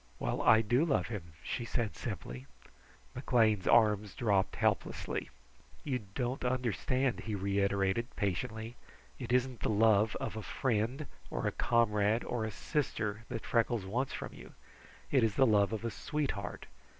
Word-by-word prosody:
"Well, -, -, -2 dB
I 110 Hz, -, +6 dB
do 120 Hz, +6 st, +2 dB
love 160 Hz, -7 st, +1 dB
him," 90 Hz, -8 st, -6 dB
she 120 Hz, -, -3 dB
said 115 Hz, -, -2 dB
simply. 65 Hz, +3 st, -6 dB, 0.7 s
McLean's 115 Hz, -6 st, +2 dB
arms 105 Hz, -3 st, +4 dB
dropped 100 Hz, -5 st, +1 dB
helplessly. -, -, -1 dB, 0.5 s
"You 130 Hz, -4 st, -1 dB, 0.2 s
don't 125 Hz, 0 st, -2 dB
understand," 125 Hz, +1 st, 0 dB
he 110 Hz, -2 st, -4 dB
reiterated 100 Hz, +3 st, 0 dB
patiently. 110 Hz, +4 st, -2 dB, 0.4 s
"It 125 Hz, -2 st, -5 dB
isn't 125 Hz, -1 st, +1 dB
the -, -, -1 dB
love 110 Hz, 0 st, +4 dB
of -, -, -4 dB
a 110 Hz, -, -4 dB
friend, 120 Hz, +5 st, -1 dB, 0.2 s
or -, -, -3 dB
a -, -, +2 dB
comrade, 110 Hz, -1 st, +2 dB
or 115 Hz, -3 st, -2 dB
a -, -, -2 dB
sister, 110 Hz, -5 st, -2 dB
that 115 Hz, -, -5 dB
Freckles 115 Hz, -3 st, +1 dB
wants 125 Hz, +8 st, -1 dB
from -, -, -6 dB
you; -, -, -12 dB, 0.6 s
it 130 Hz, -4 st, +4 dB
is 110 Hz, -1 st, +1 dB
the 135 Hz, -, +5 dB
love 105 Hz, -3 st, +4 dB
of 110 Hz, +1 st, -3 dB
a 115 Hz, -, -1 dB
sweetheart. 135 Hz, -10 st, -3 dB
110 Hz, 150 wpm, -32 LUFS, 100-125 Hz, 0.7 s, I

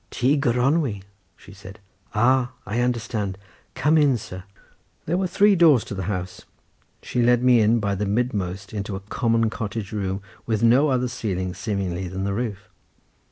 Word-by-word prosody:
"Tŷ 135 Hz, +4 st, +1 dB
Gronwy," 125 Hz, -, +1 dB, 0.3 s
she 100 Hz, -, -15 dB
said, 100 Hz, 0 st, -12 dB, 0.4 s
"ah! 125 Hz, +3 st, +2 dB
I 110 Hz, +5 st, -2 dB
understand. 115 Hz, -5 st, -1 dB, 0.4 s
Come 150 Hz, +5 st, +3 dB
in, 140 Hz, -4 st, +3 dB
sir." 95 Hz, -3 st, -9 dB, 0.6 s
There 165 Hz, -, 0 dB
were 185 Hz, +1 st, 0 dB
three 205 Hz, +3 st, +4 dB
doors 160 Hz, -9 st, +5 dB
to -, -, -7 dB
the 95 Hz, -2 st, -4 dB
house; 90 Hz, -1 st, -4 dB, 0.6 s
she 125 Hz, -, -1 dB
led 120 Hz, +1 st, +3 dB
me 125 Hz, -2 st, +5 dB
in 110 Hz, +2 st, +3 dB
by 100 Hz, -2 st, -1 dB
the 100 Hz, +1 st, -2 dB
midmost 100 Hz, -4 st, -2 dB
into 100 Hz, -1 st, -4 dB
a -, -, -4 dB
common 115 Hz, -2 st, +1 dB
cottage 105 Hz, -2 st, -5 dB
room, 100 Hz, -2 st, -3 dB, 0.2 s
with 110 Hz, -1 st, 0 dB
no 125 Hz, +6 st, +5 dB
other 125 Hz, -1 st, +1 dB
ceiling, 95 Hz, -7 st, -3 dB
seemingly, 95 Hz, -2 st, -3 dB
than 95 Hz, +2 st, -4 dB
the 100 Hz, 0 st, -1 dB
roof. 105 Hz, -3 st, -4 dB
110 Hz, 165 wpm, -23 LUFS, 100-125 Hz, 0.6 s, doors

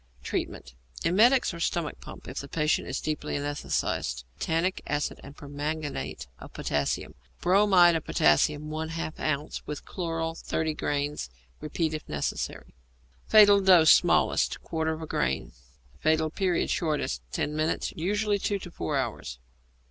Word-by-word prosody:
Treatment. -, -, -4 dB, 0.3 s
Emetics 225 Hz, +7 st, +4 dB
or 170 Hz, -, -7 dB
stomach 165 Hz, -2 st, -2 dB
pump -, -, -11 dB
if -, -, -5 dB
the 140 Hz, -, -7 dB
patient 150 Hz, +2 st, 0 dB
is 135 Hz, -, -2 dB
deeply 150 Hz, -1 st, -3 dB
anæsthetized. 145 Hz, -, -2 dB, 0.2 s
Tannic 165 Hz, +3 st, 0 dB
acid 145 Hz, 0 st, -2 dB
and 140 Hz, +1 st, -12 dB
permanganate 145 Hz, -, -4 dB
of -, -, -12 dB
potassium. 70 Hz, -1 st, -2 dB, 0.3 s
Bromide 180 Hz, -2 st, +5 dB
of 160 Hz, -, -1 dB
potassium 145 Hz, -, +3 dB
1/2 160 Hz, 0 st, -4 dB
ounce 150 Hz, -1 st, -2 dB
with 150 Hz, -1 st, -6 dB
chloral 165 Hz, -2 st, -3 dB
30 160 Hz, -1 st, -2 dB
grains, 145 Hz, -, -2 dB, 0.3 s
repeated 155 Hz, +1 st, -2 dB
if 155 Hz, -, -17 dB
necessary. 75 Hz, -1 st, -3 dB, 0.5 s
Fatal 205 Hz, -2 st, +7 dB
Dose 180 Hz, -5 st, +7 dB
(Smallest). -, -, +2 dB
Quarter 160 Hz, -1 st, -1 dB
of 160 Hz, 0 st, -7 dB
a -, -, -4 dB
grain. 65 Hz, -, -1 dB, 0.5 s
Fatal 155 Hz, -, +2 dB
Period 185 Hz, -1 st, 0 dB
(Shortest). 150 Hz, -, -1 dB
Ten 150 Hz, -, -2 dB
minutes; 155 Hz, +1 st, -1 dB
usually 205 Hz, +4 st, 0 dB
two 200 Hz, +1 st, 0 dB
to 180 Hz, -2 st, -9 dB
four 150 Hz, -3 st, -2 dB
hours. 115 Hz, -, -3 dB
155 Hz, 140 wpm, -27 LUFS, 145-175 Hz, 0.5 s, Fatal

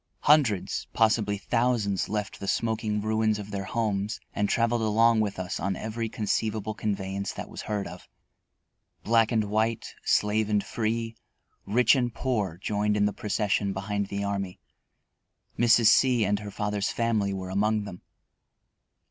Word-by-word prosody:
Hundreds, 135 Hz, -11 st, +2 dB
possibly 110 Hz, -2 st, +2 dB
thousands, 110 Hz, -2 st, 0 dB
left 105 Hz, 0 st, -3 dB
the 100 Hz, -, -6 dB
smoking 110 Hz, -1 st, 0 dB
ruins 110 Hz, 0 st, +1 dB
of 105 Hz, 0 st, -8 dB
their 100 Hz, -1 st, -3 dB
homes 105 Hz, -1 st, -1 dB
and 105 Hz, 0 st, 0 dB
traveled 115 Hz, 0 st, +1 dB
along 110 Hz, +1 st, +4 dB
with 105 Hz, -2 st, -1 dB
us 95 Hz, 0 st, -4 dB
in 95 Hz, -1 st, -1 dB
every 110 Hz, +3 st, -4 dB
conceivable 110 Hz, 0 st, -1 dB
conveyance 100 Hz, -2 st, -3 dB
that -, -, -7 dB
was -, -, -8 dB
heard 105 Hz, -2 st, -3 dB
of. 90 Hz, -, -10 dB, 0.9 s
Black 115 Hz, -1 st, +3 dB
and 110 Hz, -2 st, +2 dB
white, 110 Hz, +2 st, -1 dB
slave 105 Hz, +1 st, +2 dB
and 105 Hz, -1 st, +2 dB
free, 115 Hz, 0 st, -2 dB, 0.5 s
rich 115 Hz, +3 st, +4 dB
and 120 Hz, -3 st, 0 dB
poor, 105 Hz, -10 st, -1 dB
joined 105 Hz, +2 st, 0 dB
in 105 Hz, -, +3 dB
the 105 Hz, -, 0 dB
procession 100 Hz, -1 st, 0 dB
behind 100 Hz, +1 st, -2 dB
the 100 Hz, 0 st, -3 dB
army. 100 Hz, -2 st, -3 dB, 1.0 s
Mrs. 120 Hz, 0 st, +4 dB
C 125 Hz, -2 st, +4 dB
and 100 Hz, +1 st, +1 dB
her 105 Hz, -1 st, -7 dB
father's 105 Hz, 0 st, -2 dB
family 110 Hz, -4 st, 0 dB
were 95 Hz, -1 st, -5 dB
among 105 Hz, +2 st, +1 dB
them. 95 Hz, -3 st, -9 dB
105 Hz, 150 wpm, -27 LUFS, 100-115 Hz, 1.0 s, along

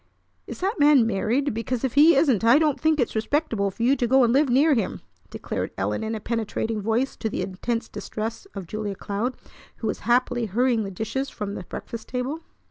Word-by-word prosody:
"Is -, -, -8 dB
that 390 Hz, +1 st, -1 dB
man 290 Hz, -5 st, +6 dB
married? 230 Hz, +6 st, 0 dB
Because, 230 Hz, +2 st, -3 dB
if 265 Hz, -, -1 dB
he 305 Hz, +3 st, +7 dB
isn't, 270 Hz, -, +3 dB
I 235 Hz, +4 st, +6 dB
don't 305 Hz, -3 st, +1 dB
think 315 Hz, -1 st, +2 dB
it's 245 Hz, -, 0 dB
respectable 225 Hz, -3 st, 0 dB
for 195 Hz, +4 st, -5 dB
you 260 Hz, +4 st, +4 dB
to 240 Hz, -, 0 dB
go 265 Hz, +2 st, +5 dB
and 235 Hz, -1 st, +3 dB
live 280 Hz, +1 st, +3 dB
near 285 Hz, +5 st, +4 dB
him!" 235 Hz, -, -1 dB, 0.3 s
declared -, -, -4 dB
Ellen -, -, -1 dB
in 220 Hz, +1 st, -2 dB
a -, -, -4 dB
penetrating 220 Hz, -1 st, -2 dB
voice 225 Hz, +6 st, 0 dB
to 220 Hz, -, -2 dB
the -, -, -3 dB
intense 230 Hz, +5 st, -3 dB
distress 225 Hz, +1 st, -6 dB
of 195 Hz, -2 st, -5 dB
Julia 210 Hz, +2 st, -4 dB
Cloud, 210 Hz, +7 st, -3 dB, 0.4 s
who -, -, -7 dB
was -, -, -2 dB
happily 240 Hz, -1 st, +1 dB
hurrying 235 Hz, +3 st, +1 dB
the 195 Hz, -, -4 dB
dishes 220 Hz, +8 st, -3 dB
from 200 Hz, -1 st, -5 dB
the -, -, -5 dB
breakfast 230 Hz, -1 st, -7 dB
table. 255 Hz, +5 st, -3 dB
235 Hz, 210 wpm, -24 LUFS, 220-270 Hz, 0.4 s, he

